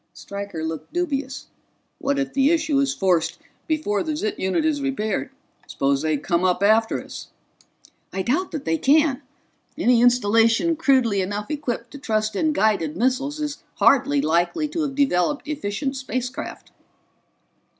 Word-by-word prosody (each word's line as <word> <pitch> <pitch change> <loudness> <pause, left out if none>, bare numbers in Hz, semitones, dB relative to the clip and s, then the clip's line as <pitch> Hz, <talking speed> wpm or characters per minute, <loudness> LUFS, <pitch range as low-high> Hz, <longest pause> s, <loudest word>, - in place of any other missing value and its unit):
Stryker 200 +1 -6
looked 160 -1 -5
dubious. 280 -6 -2 0.5
"What 280 +1 0
if 275 -2 -2
the 275 +1 +3
issue 315 -4 +2
is 275 -1 +2
forced 180 -8 +1 0.3
before 300 -11 0
the 310 -1 -2
ZIT 215 -7 -3
unit 190 - 0
is 300 -2 +1
repaired? 250 -6 -2 0.4
Suppose 140 0 0
they 155 -1 0
come 170 +4 0
up 185 +1 +1
after 220 +2 +3
us?" - - -9 0.8
"I 190 - -2
doubt 320 - 0
that 300 - -6
they 160 0 0
can. 290 -1 +3 0.6
Any 240 -1 +3
installation 230 +6 +3
crudely 260 -10 +2
enough 205 +6 -4
equipped 290 -5 -3
to 285 - -9
trust 215 -4 -1
in 315 +8 +1
guided 200 - +1
missiles 270 +6 0
is 295 -1 -4
hardly 280 +1 +4
likely 175 - +1
to 325 +2 -2
have 280 -3 -2
developed 280 0 +1
efficient 270 -2 -3
space 255 -1 -3
craft." - - -8
255 Hz, 150 wpm, -23 LUFS, 200-290 Hz, 0.8 s, hardly